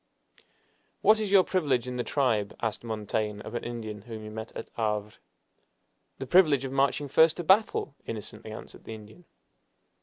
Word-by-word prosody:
"What 215 +1 +5
is 215 -2 -1
your 195 -1 +6
privilege 140 -11 0
in 125 0 -4
the 120 - 0
tribe?" 115 -9 0
asked 110 0 -2
Montaigne 105 -1 -2
of 110 - -8
an 120 - -3
Indian 110 -3 -5
whom 110 0 -8
he 110 - -7
met 110 +1 -7
at - - -7
Havre. 105 -2 -1 1.0
"The 135 - -5
privilege 145 -3 +5
of 130 - -4
marching 135 +1 +1
first 160 +4 +5
to 175 - -3
battle!" 190 -4 +3
innocently 110 0 -7
answered 110 - -10
the 110 - -6
Indian. 110 +11 -14
120 Hz, 170 wpm, -28 LUFS, 110-145 Hz, 1.0 s, your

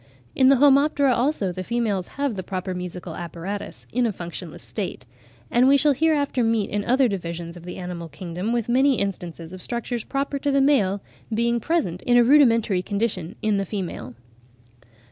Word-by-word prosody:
In 260 0 +5
the 275 - +7
Homoptera, 280 0 +4
also, 240 -6 0
the 185 +1 -5
females 215 -4 -1
have 280 -3 0
the 190 - -4
proper 185 0 -4
musical 180 0 -6
apparatus 175 +4 -6
in 245 0 +2
a - - 0
functionless 175 -3 -8
state; 190 - -5 0.5
and 245 +2 +4
we 280 +1 +6
shall 295 0 +4
hereafter 285 -3 +1
meet 225 -3 +1
in 205 0 -1
other 255 +3 +3
divisions 170 -4 -5
of 175 -1 -12
the 180 - -7
animal 180 -2 -6
kingdom 175 +7 -4
with 235 -2 0
many 265 +3 +4
instances 175 -3 -4
of 185 - -9
structures 235 +1 -3
proper 280 0 -2
to 285 - -1
the 275 0 +3
male 205 -9 +2 0.3
being 235 +2 +1
present 230 - -1
in 245 0 +3
a 240 - +7
rudimentary 230 -8 +4
condition 200 -2 -2
in 215 -2 +2
the 195 - 0
female. 185 - -5
215 Hz, 180 wpm, -24 LUFS, 180-260 Hz, 0.5 s, the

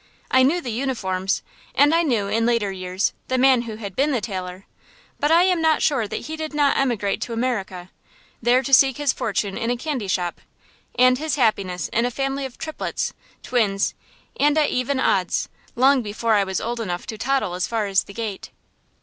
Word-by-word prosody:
I 260 - +5
knew 305 +7 +3
the 245 - -4
uniforms, 210 -6 -1 0.3
and 290 +2 +5
I 335 - +4
knew, 235 -11 0
in 220 +3 0
later 230 -4 +1
years, 185 0 -2
the 260 - 0
man 260 -1 +5
who 215 - -5
had 200 -3 -7
been 285 +5 +2
the 255 - +1
tailor; 185 -3 -6 0.5
but 295 - +1
I 335 +2 +6
am 365 -2 +2
not 320 -1 +3
sure 260 -8 +1
that - - -4
he 315 - -6
did 315 -1 -5
not 290 -2 +3
emigrate 230 -7 0
to 235 - -4
America, 195 -7 -3 0.5
there 245 +2 +3
to 275 - -4
seek 270 0 +6
his 290 -2 +1
fortune 200 -2 -2
in 230 0 -1
a 245 - 0
candy 260 -6 -3
shop, 180 -3 -2 0.6
and 255 +1 +5
his 315 0 -1
happiness 200 -8 0
in 230 +2 +1
a - - -1
family 270 +2 -2
of 255 - -18
triplets, 315 -1 -3 0.3
twins, 205 -5 +1 0.5
and 295 +1 +3
even 275 -3 +1
odds, 185 -7 +1 0.3
long 265 +2 +4
before 220 +1 -1
I 200 -2 +3
was 190 -1 -2
old 235 +1 -3
enough 180 -5 -4
to 220 -4 -6
toddle 265 -6 0
as 180 +1 -1
far 225 -2 -1
as 195 -1 +1
the 200 - -11
gate. 220 -4 -5
235 Hz, 200 wpm, -22 LUFS, 200-275 Hz, 0.6 s, I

